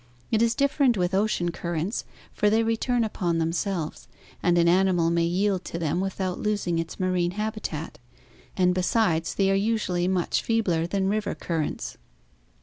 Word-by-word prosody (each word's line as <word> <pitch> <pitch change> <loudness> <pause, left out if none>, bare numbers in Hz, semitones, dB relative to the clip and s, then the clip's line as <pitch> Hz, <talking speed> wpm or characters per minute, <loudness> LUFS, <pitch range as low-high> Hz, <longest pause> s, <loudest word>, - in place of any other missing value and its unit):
It 220 - +3
is 230 0 +3
different 275 -4 +2
with 180 0 0
ocean 190 -3 +1
currents, 170 +4 -3 0.3
for 210 - +2
they 220 +2 +3
re 225 0 +1
turn 245 +1 0
upon 180 -6 -1
themselves 165 0 -2 0.3
and 175 -1 +3
an 170 0 +4
animal 175 -2 +3
may 170 0 +2
yield 185 +2 0
to - - -5
them 165 +1 -1
without 190 -1 -2
losing 205 -6 0
its 165 0 -5
marine 180 -1 0
habitat; 210 - -4 0.6
and 180 -1 +3
besides, 180 -3 +1
they 195 -1 +2
are - - +3
usually 195 -4 0
much 185 -2 +1
feebler 185 -8 +1
than 190 +1 0
river 210 +1 -1
currents. 160 -3 -3
185 Hz, 160 wpm, -26 LUFS, 170-210 Hz, 0.6 s, an